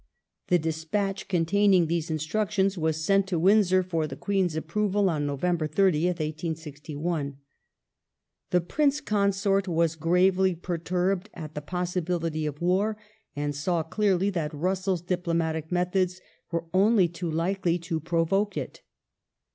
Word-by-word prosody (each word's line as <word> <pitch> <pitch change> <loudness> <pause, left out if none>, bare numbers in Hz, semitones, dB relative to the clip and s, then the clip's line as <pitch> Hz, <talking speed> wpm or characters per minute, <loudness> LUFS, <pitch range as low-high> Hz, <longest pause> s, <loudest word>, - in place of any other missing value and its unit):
The 180 - +4
despatch 165 +5 -2
containing 185 +1 +3
these 165 0 -1
instructions 195 +5 0
was 160 -2 -1
sent 195 +1 +3
to 185 -3 -1
Windsor 185 +1 +4
for 165 -4 -1
the 135 - -7
Queen's 190 -1 0
approval 200 +4 +1
on 145 -2 -1
November 155 +3 0
30th, 175 +1 +2
1861. 155 -1 -4 1.1
The 180 - +3
Prince 285 - +1
Consort 200 -3 +1
was 165 -2 +1
gravely 180 +3 +3
perturbed 180 +3 -1
at 155 -3 -7
the 150 - -5
possibility 175 -1 -2
of 150 +2 -6
war, 200 +5 +1 0.4
and 145 0 -2
saw 165 +3 0
clearly 195 +2 +1
that 160 -5 -2
Russell's 185 +2 -1
diplomatic 165 -3 -1
methods 180 +1 0 0.3
were 170 -1 -2
only 195 0 +4
too 170 0 -5
likely 175 +2 0
to 170 -1 -3
provoke 170 +5 0
it. - - -5
175 Hz, 130 wpm, -27 LUFS, 160-190 Hz, 1.1 s, The